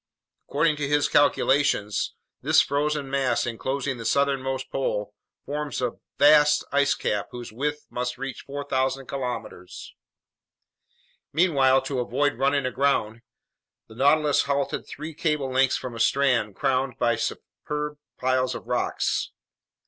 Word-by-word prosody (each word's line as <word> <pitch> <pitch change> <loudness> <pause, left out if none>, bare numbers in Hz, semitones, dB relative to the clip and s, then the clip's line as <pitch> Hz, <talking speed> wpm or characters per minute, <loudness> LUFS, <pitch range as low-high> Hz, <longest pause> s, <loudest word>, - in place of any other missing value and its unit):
According 155 -2 +2
to 145 -1 -2
his 145 0 +2
calculations, 140 -7 +2 0.3
this - - +4
frozen 145 0 0
mass 135 -1 0
enclosing 130 +3 -3
the - - -6
southernmost 135 0 0
pole 105 -6 -2 0.3
forms 145 -2 -3
a 125 -2 0 0.3
vast 150 0 +6
ice 140 0 +3
cap 105 -1 -2
whose 120 -3 -8
width 150 +5 -3
must 125 0 -3
reach 135 -1 -5
4,000 135 -1 -2
kilometers. 125 -8 -6 1.4
Meanwhile, 140 -5 +3
to 135 -3 -3
avoid 140 +4 0
running 140 0 +2
aground, 130 -4 0 0.7
the - - -14
Nautilus 145 +4 +3
halted 140 0 -1
three 155 +3 -7
cable 150 -3 -1
lengths 130 0 +3
from 125 - -6
a - - -7
strand 125 -4 +2
crowned 135 -2 0
by 120 0 +2
superb 150 +5 -4 0.2
piles 130 0 +1
of - - -8
rocks. - - -1
135 Hz, 125 wpm, -25 LUFS, 125-145 Hz, 1.4 s, vast